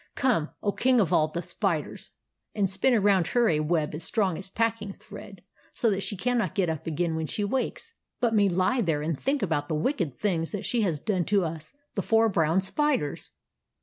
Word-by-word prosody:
Come, 220 -13 +1
O 205 - +2
King 255 +3 +2
of 195 -7 +2
all 155 - +4
the 170 +3 -5
Spiders, 175 -3 -3 0.5
and 205 -2 +2
spin 195 +7 +2
around 195 -5 +3
her 240 -1 +2
a 150 - +2
web 155 0 0
as 155 +2 -5
strong 195 -2 0
as 190 +3 -7
pack 230 +2 0
ing 200 -2 -6
thread, - - -12 0.3
so 230 - +2
that 195 0 -1
she 205 - -3
cannot 230 -4 0
get 185 -4 +1
up 160 -1 -4
again 165 +1 -1
when 160 -1 -2
she 205 - -1
wakes, 265 - -3 0.3
but 235 -2 +1
may 205 -2 +4
lie 185 +8 +1
there 160 -7 0
and 160 +1 -1
think 275 +2 0
about 145 -5 -1
the 160 - 0
wicked 160 - -1
things 170 -4 -1
that 205 - -4
she 240 - +1
has 170 -8 0
done 185 0 -1
to 200 -4 +2
us, 160 -1 -6 0.2
the - - -1
four 225 0 +3
brown 165 -1 +2
spiders! 260 - -1
190 Hz, 215 wpm, -27 LUFS, 160-225 Hz, 0.5 s, all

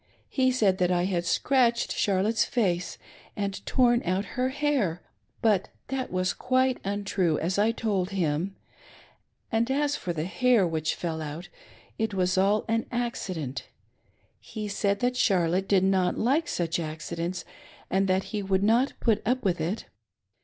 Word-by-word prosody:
He 260 -1 +2
said 205 -7 +2
that 180 -1 +2
I 175 0 +2
had 175 -2 -1
scratched 245 -3 +2
charlotte's 210 +3 +2
face 185 -8 -1 0.4
and 200 -1 -3
torn 240 -2 +3
out 185 +3 0
her 255 +1 0
hair; 265 - 0 0.4
but 210 -4 +2 0.2
that 265 -1 -3
was 185 -1 0
quite 255 0 +1
untrue, 195 -5 0
as 185 +4 -1
I 215 +2 +4
told 200 -5 -1
him; 180 0 -1 1.0
and 225 +2 +1
as 290 +1 +1
for 180 - -4
the 160 -2 -2
hair 240 +1 +3
which 160 -2 -1
fell 160 -2 -3
out, 155 +3 -6 0.5
it 220 -2 -1
was 185 0 +1
all 200 +3 +2
an 225 0 0
accident. 185 - -3 0.7
He 215 -2 -6
said 200 0 0
that 250 0 +1
Charlotte 185 -2 +2
did 190 -2 +3
not 190 -1 +2
like 280 +9 +1
such 170 0 -1
acci 160 +1 -5
dents 175 +2 -3 0.5
and 195 +1 +2
that 190 0 +2
he 210 - -1
would 195 0 +1
not 235 +6 +3
put 220 -3 +2
up 250 +3 0
with 175 -4 +1
it. 180 +8 -2
195 Hz, 160 wpm, -27 LUFS, 180-235 Hz, 1.0 s, I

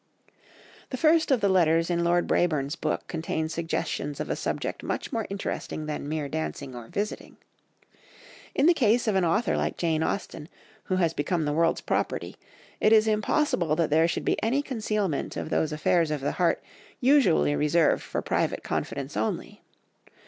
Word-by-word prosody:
The 255 - -4
first 320 +3 +3
of 260 -5 +3
the 200 - +3
letters 165 -2 +3
in 170 0 +1
Lord 175 0 +2
Brabourne's 150 -4 +1
book 155 -3 -2
contains 160 -1 -3
suggestions 160 -3 -3
of - - -3
a - - 0
subject - - -3
much - - -4
more 225 -2 -1
interesting 195 -5 -4
than 150 -1 -4
mere 155 -2 -2
dancing 140 -2 -4
or 120 -2 -8
visiting. 205 - -4 1.2
In 275 - +3
the 345 - +7
case 235 -5 +2
of 215 - +2
an 190 -1 +2
author 205 +7 +1
like - - -1
Jane 160 -2 0
Austen, 160 -2 -3 0.4
who 185 - 0
has 170 -3 +1
become 160 +2 -1
the 145 - 0
world's 165 +2 +2
property, - - -2 0.4
it 215 - +3
is 220 0 +6
impossible 210 - +1
that 165 -2 0
there 160 +2 +4
should - - -3
be - - 0
any 260 +6 +1
concealment 215 - -2
of - - -5
those 155 - +1
affairs 160 +2 +2
of 150 -1 -1
the 140 - 0
heart 175 -2 +1 0.4
usually 250 - +4
reserved 150 +2 +2
for - - -4
private - - -1
confidence 140 +1 -3
only. 110 +1 -3
170 Hz, 170 wpm, -27 LUFS, 155-210 Hz, 1.2 s, the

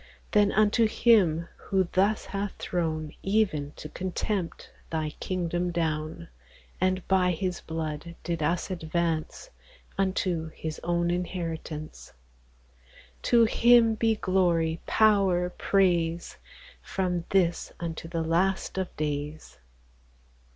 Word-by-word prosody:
Then 205 -1 +4
unto 215 +2 +4
Him 190 -8 +3
who 190 -2 0
thus 200 +3 +2
hath 200 0 -3
thrown, 155 -3 -2
Even 190 -9 +1
to - - -8
contempt, 185 +2 -3 0.2
thy 155 -2 -2
kingdome 175 -1 -1
down, 160 0 -2 0.5
And 185 0 +1
by 185 -1 +3
His 180 +1 -3
blood 160 0 -5
did 170 -2 -2
us 170 +5 0
advance 170 - -2 0.5
Unto 185 -4 0
His 160 -1 -5
own 175 0 +1
inheritance, 165 -3 -5 1.1
To 235 -1 +5
Him 235 0 +5
be 225 0 +2
glory, 175 -5 +1
power, 195 -5 +3
praise, 175 -4 +1 0.4
From 180 -3 -2
this 175 -3 +1
unto 165 -1 -5
the 165 -1 -2
last 185 +4 0
of 190 - -1
daies. 150 - -4
175 Hz, 110 wpm, -27 LUFS, 165-195 Hz, 1.1 s, To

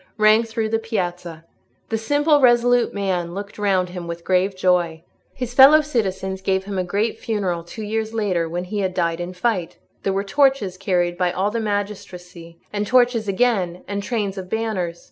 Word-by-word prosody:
rang 215 +1 +5
through 225 -1 -3
the 225 +1 0
piazza. 175 -7 -4 0.4
The 225 - 0
simple, 290 +5 +2
resolute 245 -1 +4
man 185 -4 -2
looked 200 +1 -7
round 190 -3 +1
him 180 -1 -7
with 170 0 -6
grave 190 +2 +1
joy. 175 -3 +1 0.3
His 250 -2 -5
fellow 275 +4 +8
citizens 190 -9 -2
gave 190 0 0
him 195 -1 -4
a - - +1
great 205 +5 -1
funeral 190 -6 -2
two 215 +6 -8
years 220 +1 -2
later, 190 -7 -1
when 175 +2 -3
he 205 +3 -4
had 190 -2 -1
died 170 -1 0
in 175 +1 -5
fight; 185 -2 -1 0.2
there 195 - -1
were 195 +1 -1
torches 265 -4 +2
carried 180 -2 -1
by 180 -1 +2
all 195 +4 -1
the 230 - -2
magistracy, 185 -5 -5 0.2
and 205 0 -2
torches 245 -3 +3
again, 195 -4 0
and 200 0 -3
trains 200 -3 -2
of 185 -1 -8
banners. 190 -7 -2
195 Hz, 185 wpm, -21 LUFS, 180-225 Hz, 0.4 s, fellow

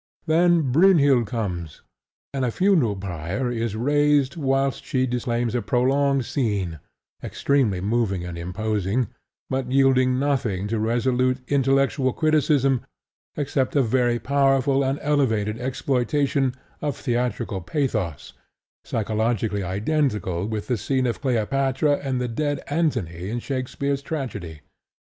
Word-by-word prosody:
Then 165 -3 +3
Brynhild 140 - +5
comes; 90 -8 -4 0.5
and 135 -1 -1
a 125 - +1
funeral 160 - +2
pyre 95 +6 -3
is 115 -2 -2
raised 145 +3 +2
whilst 135 -3 0
she 130 -1 0
declaims 120 -1 -1
a 120 - 0
prolonged 135 +2 +1
scene, 100 - -2 0.4
extremely 125 -10 +1
moving 100 -3 0
and 90 -1 -6
imposing, 105 +5 -1 0.4
but 130 -1 -2
yielding 130 -1 +3
nothing 125 -9 0
to 115 0 -1
resolute 125 +3 +1
intellectual 135 -1 +2
criticism 145 -4 +2 0.6
except 140 -2 -1
a 140 - +4
very 120 0 +2
powerful 135 +2 +2
and 135 +1 0
elevated 115 -7 +1
exploitation 130 +1 0 0.3
of 145 -4 -2
theatrical 120 -6 -2
pathos, 110 - -2 0.5
psychologically 110 -1 -1
identical 100 - -1
with 110 -2 -3
the 125 - -1
scene 130 +3 0
of 120 - -2
Cleopatra 135 +3 +1
and 135 -2 -2
the 125 - -1
dead 145 +4 -2
Antony 95 - -1
in 120 - -2
Shakespeare's 135 +2 -2
tragedy. 100 - -5
125 Hz, 120 wpm, -23 LUFS, 110-140 Hz, 0.6 s, Brynhild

